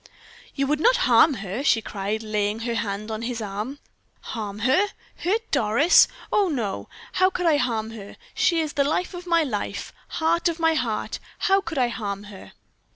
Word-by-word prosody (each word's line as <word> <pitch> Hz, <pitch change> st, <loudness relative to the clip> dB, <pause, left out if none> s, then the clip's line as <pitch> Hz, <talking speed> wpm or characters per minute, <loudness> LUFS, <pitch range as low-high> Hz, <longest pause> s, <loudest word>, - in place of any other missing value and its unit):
"You 275 Hz, -, +1 dB
would 295 Hz, +2 st, 0 dB
not -, -, +5 dB
harm 295 Hz, -, +5 dB
her!" 200 Hz, +9 st, -3 dB
she 235 Hz, -6 st, +4 dB
cried, 210 Hz, 0 st, -3 dB
laying 210 Hz, 0 st, -1 dB
her 235 Hz, 0 st, -2 dB
hand 210 Hz, -1 st, -3 dB
on 220 Hz, 0 st, -4 dB
his 235 Hz, 0 st, -3 dB
arm. 215 Hz, +6 st, -4 dB, 0.4 s
"Harm 210 Hz, -2 st, -5 dB
her! 365 Hz, +11 st, +4 dB, 0.3 s
hurt 440 Hz, +6 st, -1 dB
Doris! 235 Hz, +10 st, +5 dB, 0.2 s
Oh, 400 Hz, -3 st, +3 dB
no! 230 Hz, -10 st, -3 dB, 0.2 s
how 370 Hz, +1 st, +3 dB
could 360 Hz, -1 st, -3 dB
I 315 Hz, -3 st, +4 dB
harm 225 Hz, -4 st, -1 dB
her? 205 Hz, -3 st, -10 dB, 0.2 s
She 340 Hz, -3 st, +2 dB
is 310 Hz, -2 st, -4 dB
life 290 Hz, +7 st, 0 dB
of 355 Hz, 0 st, -8 dB
my 335 Hz, -1 st, +4 dB
life, 215 Hz, -8 st, -4 dB, 0.2 s
heart 335 Hz, +2 st, +2 dB
of 335 Hz, 0 st, -4 dB
my 325 Hz, 0 st, +3 dB
heart! 240 Hz, -8 st, -2 dB, 0.2 s
How 390 Hz, -1 st, +3 dB
could 335 Hz, -4 st, -6 dB
I 250 Hz, -2 st, +3 dB
harm 205 Hz, -4 st, -4 dB
her?" 190 Hz, -, -12 dB
250 Hz, 180 wpm, -24 LUFS, 215-330 Hz, 0.4 s, not